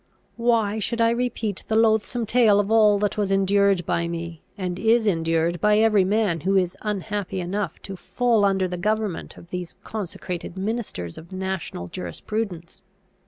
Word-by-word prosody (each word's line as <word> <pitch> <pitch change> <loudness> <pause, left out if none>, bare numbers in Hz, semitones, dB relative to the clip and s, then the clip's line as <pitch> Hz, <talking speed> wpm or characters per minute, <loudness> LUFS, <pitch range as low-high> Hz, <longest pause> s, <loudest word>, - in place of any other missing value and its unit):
Why 230 -3 +2
should 235 +3 -2
I 230 0 +4
repeat 235 -4 -2
the 220 - 0
loathsome 225 +1 +2
tale 220 -3 +4
of 205 +1 0
all 215 -2 +5
that 205 +1 -1
was 200 -2 0
endured 195 -1 +3
by 170 0 0
me, 170 -1 -5 0.2
and 180 -2 -3
is 225 +1 +3
endured 165 -2 +1
by 210 0 +4
every 215 -3 +4
man 200 -3 +1
who 195 +5 +1
is 180 -2 +1
unhappy 205 -2 -3
enough 185 +1 -3
to 195 - -6
fall 235 +3 +1
under 195 -2 +2
the 180 0 -4
government 210 -1 -2
of 170 - -15
these 180 -2 -5
consecrated 185 -3 -5
ministers 195 - -4
of 165 +3 -15
national 190 - -4
jurisprudence? 170 - -5
200 Hz, 165 wpm, -24 LUFS, 175-220 Hz, 0.2 s, all